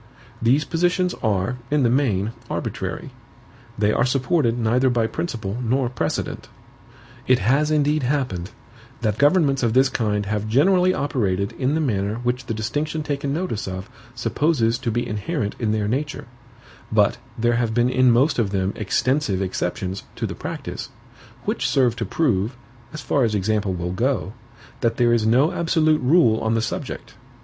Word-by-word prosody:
These 130 Hz, +6 st, +3 dB
positions 180 Hz, +2 st, +1 dB
are, 105 Hz, +2 st, 0 dB
in 150 Hz, -1 st, +2 dB
the 120 Hz, -, +4 dB
main, 110 Hz, -6 st, +1 dB, 0.2 s
arbitrary; -, -, -4 dB, 0.7 s
they 105 Hz, 0 st, +2 dB
are -, -, +2 dB
supported 130 Hz, -1 st, +1 dB
neither 120 Hz, +3 st, +2 dB
by 120 Hz, -2 st, +1 dB
principle 110 Hz, -, -3 dB
nor 125 Hz, +1 st, +1 dB
precedent. 120 Hz, -, -3 dB, 0.8 s
It 130 Hz, -, +5 dB
has 135 Hz, +9 st, +2 dB
indeed 150 Hz, 0 st, +2 dB
happened, 125 Hz, -10 st, -1 dB, 0.5 s
that 110 Hz, -2 st, -1 dB
governments 145 Hz, -2 st, +3 dB
of 115 Hz, -3 st, +1 dB
this 130 Hz, +2 st, +4 dB
kind 105 Hz, -5 st, -1 dB
have 105 Hz, +1 st, -2 dB
generally 180 Hz, -, +4 dB
operated 100 Hz, -, -1 dB
in 135 Hz, +3 st, -1 dB
the -, -, +1 dB
manner 105 Hz, -7 st, 0 dB
which 125 Hz, +1 st, -1 dB
the -, -, -1 dB
distinction 145 Hz, +8 st, -2 dB
taken 140 Hz, -1 st, -2 dB
notice 155 Hz, -, -2 dB
of, 95 Hz, +4 st, -6 dB, 0.2 s
supposes 120 Hz, -2 st, +1 dB
to 130 Hz, -3 st, -2 dB
be 120 Hz, +2 st, -1 dB
inherent 105 Hz, -, -3 dB
in 110 Hz, -3 st, 0 dB
their 105 Hz, -1 st, 0 dB
nature; 145 Hz, +7 st, -2 dB, 0.7 s
but 110 Hz, +1 st, +3 dB, 0.2 s
there 120 Hz, +1 st, +2 dB
have 115 Hz, -2 st, 0 dB
been 120 Hz, +1 st, +3 dB
in 130 Hz, 0 st, +4 dB
most 125 Hz, +4 st, +3 dB
of 110 Hz, -4 st, +1 dB
them 95 Hz, 0 st, -1 dB
extensive 120 Hz, 0 st, 0 dB
exceptions 95 Hz, 0 st, -3 dB
to -, -, -3 dB
the -, -, -4 dB
practice, -, -, -6 dB, 0.6 s
which -, -, 0 dB
serve 125 Hz, -4 st, +2 dB
to 115 Hz, -, -2 dB
prove, 120 Hz, -, 0 dB, 0.4 s
as 155 Hz, -, -7 dB
far 140 Hz, -, +1 dB
as 110 Hz, -2 st, +1 dB
example 105 Hz, -1 st, 0 dB
will 90 Hz, 0 st, -3 dB
go, 120 Hz, -1 st, -1 dB, 0.5 s
that 115 Hz, -1 st, 0 dB
there 120 Hz, -1 st, +3 dB
is 110 Hz, -2 st, +2 dB
no 130 Hz, +9 st, +4 dB
absolute 160 Hz, -3 st, +2 dB
rule 125 Hz, -5 st, +4 dB
on 110 Hz, +1 st, 0 dB
the 115 Hz, -, +1 dB
subject. 110 Hz, -, -5 dB
120 Hz, 165 wpm, -22 LUFS, 110-145 Hz, 0.8 s, It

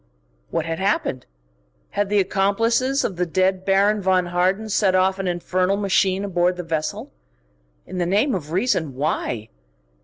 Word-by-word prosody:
What 165 Hz, -, -2 dB
had 165 Hz, 0 st, -3 dB
happened? 190 Hz, -9 st, -1 dB, 0.6 s
Had 205 Hz, -1 st, -1 dB
the 205 Hz, -, +2 dB
accomplices 225 Hz, +8 st, +1 dB
of 185 Hz, -, -3 dB
the 180 Hz, -, +1 dB
dead 185 Hz, +2 st, +1 dB
Baron 200 Hz, +2 st, +2 dB
von 185 Hz, -1 st, +2 dB
Harden 185 Hz, +5 st, 0 dB
set 200 Hz, -2 st, +2 dB
off 190 Hz, +1 st, +2 dB
an 190 Hz, -, -2 dB
infernal 185 Hz, +2 st, 0 dB
machine 195 Hz, -1 st, +1 dB
aboard 180 Hz, -1 st, +1 dB
the 180 Hz, -, -4 dB
vessel? 160 Hz, -2 st, -3 dB, 0.7 s
In 185 Hz, -, -6 dB
the 175 Hz, -, 0 dB
name 210 Hz, +9 st, +2 dB
of 155 Hz, -6 st, -4 dB
reason, 170 Hz, -, 0 dB
why? 125 Hz, -5 st, -2 dB
185 Hz, 155 wpm, -22 LUFS, 175-200 Hz, 0.7 s, the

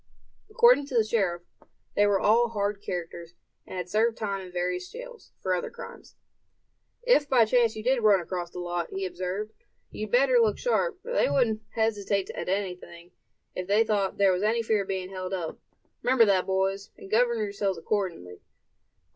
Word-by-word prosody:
According 435 Hz, -, +5 dB
to 265 Hz, -, -6 dB
the 230 Hz, -, +5 dB
sheriff, 195 Hz, -6 st, -1 dB, 0.5 s
they 205 Hz, 0 st, +4 dB
were 200 Hz, -1 st, +2 dB
all 235 Hz, +3 st, +3 dB
hard 205 Hz, -2 st, -2 dB
characters, 170 Hz, -2 st, -6 dB, 0.3 s
and -, -, -7 dB
had 180 Hz, -1 st, -4 dB
served 225 Hz, +4 st, +1 dB
time 200 Hz, -3 st, -3 dB
in 180 Hz, -, -11 dB
various 180 Hz, 0 st, -2 dB
jails, -, -, -11 dB
for 185 Hz, -, -1 dB
other 180 Hz, -, -2 dB
crimes. -, -, -11 dB, 0.9 s
"If 395 Hz, -, +3 dB
by 245 Hz, -4 st, +5 dB
chance 230 Hz, 0 st, +2 dB
you 215 Hz, -, -6 dB
did 255 Hz, +1 st, +2 dB
run 210 Hz, -3 st, +5 dB
across 175 Hz, 0 st, -4 dB
the -, -, -11 dB
lot," 175 Hz, -1 st, -3 dB
he 195 Hz, 0 st, -4 dB
observed; 185 Hz, +4 st, -4 dB, 0.4 s
"you'd 215 Hz, 0 st, -5 dB
better 250 Hz, +1 st, +4 dB
look 220 Hz, -3 st, +2 dB
sharp, 480 Hz, -4 st, -1 dB
for 485 Hz, +2 st, -5 dB
they -, -, +2 dB
wouldn't 225 Hz, -5 st, +1 dB
hesitate 205 Hz, -3 st, 0 dB
at -, -, -5 dB
anything, 180 Hz, -3 st, -4 dB, 0.4 s
if 185 Hz, -, -5 dB
they 210 Hz, +3 st, +4 dB
thought 205 Hz, -3 st, -1 dB
there 200 Hz, -1 st, +4 dB
was 180 Hz, 0 st, 0 dB
any 225 Hz, +2 st, +1 dB
fear 220 Hz, -2 st, +1 dB
of 195 Hz, -, -6 dB
being 190 Hz, -1 st, -4 dB
held 185 Hz, 0 st, -4 dB
up. 170 Hz, -3 st, -5 dB, 0.4 s
Remember 250 Hz, -2 st, +4 dB
that, 190 Hz, -3 st, +2 dB
boys, 195 Hz, +1 st, -1 dB
and 195 Hz, -, -12 dB
govern 235 Hz, +1 st, +3 dB
yourselves 200 Hz, -3 st, -2 dB
accordingly." 165 Hz, -, -3 dB
200 Hz, 180 wpm, -27 LUFS, 185-230 Hz, 0.9 s, According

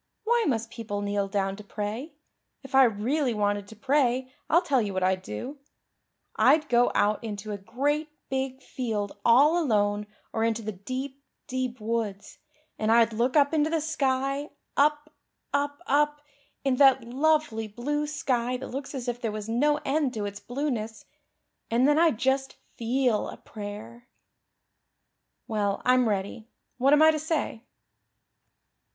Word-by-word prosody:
"Why 470 Hz, +1 st, +2 dB
must 230 Hz, -3 st, -1 dB
people 205 Hz, -3 st, -4 dB
kneel 200 Hz, 0 st, -1 dB
down 195 Hz, -1 st, -1 dB
to 210 Hz, -, -10 dB
pray? 215 Hz, +8 st, -5 dB, 0.5 s
If 270 Hz, -, -12 dB
I 265 Hz, 0 st, +7 dB
really 240 Hz, +4 st, 0 dB
wanted 205 Hz, -1 st, 0 dB
to 220 Hz, -, -12 dB
pray 260 Hz, 0 st, +1 dB, 0.2 s
I'll 335 Hz, +3 st, +4 dB
tell 270 Hz, -3 st, +2 dB
you 200 Hz, -3 st, -3 dB
what 185 Hz, -, 0 dB
I'd 185 Hz, 0 st, +1 dB
do. 255 Hz, -, -6 dB, 0.8 s
I'd 290 Hz, +7 st, +4 dB
go 245 Hz, 0 st, +4 dB
out 210 Hz, +2 st, +2 dB
into 210 Hz, -1 st, -5 dB
a 205 Hz, -, -3 dB
great 285 Hz, +9 st, -1 dB, 0.2 s
big 265 Hz, 0 st, -3 dB
field 215 Hz, -5 st, -3 dB
all 290 Hz, +9 st, +5 dB
alone 205 Hz, -4 st, +1 dB, 0.3 s
or 225 Hz, -, 0 dB
into 225 Hz, 0 st, 0 dB
the 215 Hz, -, -3 dB
deep, 260 Hz, +8 st, -6 dB, 0.2 s
deep, 255 Hz, -1 st, -3 dB
woods, 215 Hz, -2 st, -3 dB, 0.4 s
and 220 Hz, 0 st, +1 dB
I'd 230 Hz, 0 st, +5 dB
look 245 Hz, +6 st, +1 dB
up 285 Hz, +1 st, +4 dB
into 310 Hz, 0 st, +2 dB
the 325 Hz, 0 st, +1 dB
sky 275 Hz, -2 st, -1 dB, 0.3 s
up 295 Hz, +1 st, +2 dB, 0.4 s
up 285 Hz, +3 st, -1 dB
up 295 Hz, +1 st, +2 dB, 0.4 s
into 260 Hz, -2 st, +1 dB
that 265 Hz, -3 st, +6 dB
lovely 265 Hz, -2 st, +1 dB
blue 290 Hz, +8 st, -2 dB
sky 250 Hz, -4 st, -1 dB
that -, -, -8 dB
looks 275 Hz, +2 st, -5 dB
as 255 Hz, -2 st, -5 dB
if 240 Hz, 0 st, -3 dB
there 225 Hz, -, -1 dB
was 210 Hz, 0 st, -5 dB
no 290 Hz, +6 st, +2 dB
end 275 Hz, -2 st, 0 dB
to 210 Hz, -2 st, -2 dB
its 205 Hz, 0 st, -6 dB
blueness. 240 Hz, -4 st, -4 dB, 0.6 s
And 240 Hz, +4 st, +3 dB
then 295 Hz, +1 st, +4 dB
I'd 330 Hz, -9 st, +4 dB
just 265 Hz, +2 st, 0 dB, 0.2 s
feel 240 Hz, -1 st, 0 dB
a -, -, -9 dB
prayer. 215 Hz, +3 st, -9 dB, 1.4 s
Well, 205 Hz, -4 st, 0 dB
I'm 250 Hz, -2 st, +4 dB
ready. 205 Hz, +2 st, -3 dB, 0.3 s
What 270 Hz, +3 st, +4 dB
am 295 Hz, +1 st, +6 dB
I 315 Hz, -, +8 dB
to 310 Hz, -, -2 dB
say?" 310 Hz, -7 st, -2 dB
250 Hz, 160 wpm, -27 LUFS, 215-285 Hz, 1.4 s, I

